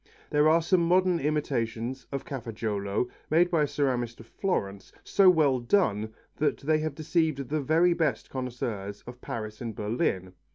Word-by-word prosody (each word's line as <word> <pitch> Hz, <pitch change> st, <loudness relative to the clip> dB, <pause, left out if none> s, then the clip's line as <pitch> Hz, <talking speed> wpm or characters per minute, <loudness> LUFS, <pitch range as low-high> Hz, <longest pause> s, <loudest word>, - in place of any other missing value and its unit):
There 150 Hz, +1 st, +4 dB
are 165 Hz, +1 st, +4 dB
some 180 Hz, +1 st, +3 dB
modern 180 Hz, +1 st, +3 dB
imitations 130 Hz, -4 st, -2 dB
of 140 Hz, -1 st, -4 dB
Cafaggiolo 110 Hz, -4 st, -2 dB, 0.2 s
made 175 Hz, +3 st, +3 dB
by 165 Hz, -3 st, +3 dB
a 150 Hz, -, +2 dB
ceramist 130 Hz, -5 st, -1 dB
of 115 Hz, -, -11 dB
Florence 100 Hz, -, -3 dB
so 195 Hz, -2 st, +5 dB
well 150 Hz, -7 st, +4 dB
done 115 Hz, -, +1 dB, 0.3 s
that 150 Hz, -, +1 dB
they 155 Hz, +2 st, +1 dB
have 155 Hz, -2 st, -3 dB
deceived 155 Hz, -4 st, 0 dB
the 155 Hz, +4 st, +3 dB
best 150 Hz, -10 st, -1 dB
connoisseurs 120 Hz, -6 st, -4 dB
of 125 Hz, +1 st, -10 dB
Paris 110 Hz, -2 st, -6 dB
and 115 Hz, -3 st, -5 dB
Berlin. 105 Hz, -, -1 dB
135 Hz, 155 wpm, -28 LUFS, 115-160 Hz, 0.3 s, so